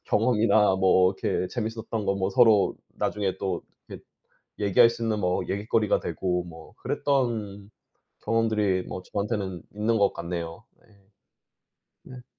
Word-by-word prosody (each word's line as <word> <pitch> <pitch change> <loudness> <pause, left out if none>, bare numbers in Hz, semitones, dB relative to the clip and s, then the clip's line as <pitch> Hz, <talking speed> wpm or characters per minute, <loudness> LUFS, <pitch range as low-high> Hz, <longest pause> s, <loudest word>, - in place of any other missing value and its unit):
경험이나 110 -3 +3
뭐 95 0 +4
이렇게 90 - -1
재밌었던 110 0 -4
거 100 - +2
뭐 95 0 0
서로 110 -2 +4 0.2
나중에 100 -2 -2
또 95 - -3 0.3
이렇게 - - -10 0.6
얘기할 105 +4 +5
수 115 0 -7
있는 110 -2 0
뭐 90 -1 0
얘깃거리가 105 +2 +1
되고 90 -2 -2
뭐 80 -2 -13
그랬던 110 -7 -1 0.5
경험들이 105 -5 +1
뭐 - - -5
저한테는 100 -4 -3
있는 110 +2 0
것 100 -1 +3
같네요. 85 +2 -6 0.2
네. - - -27 1.3
네. 125 - -13
105 Hz, 280 characters per minute, -26 LUFS, 95-115 Hz, 1.3 s, 얘기할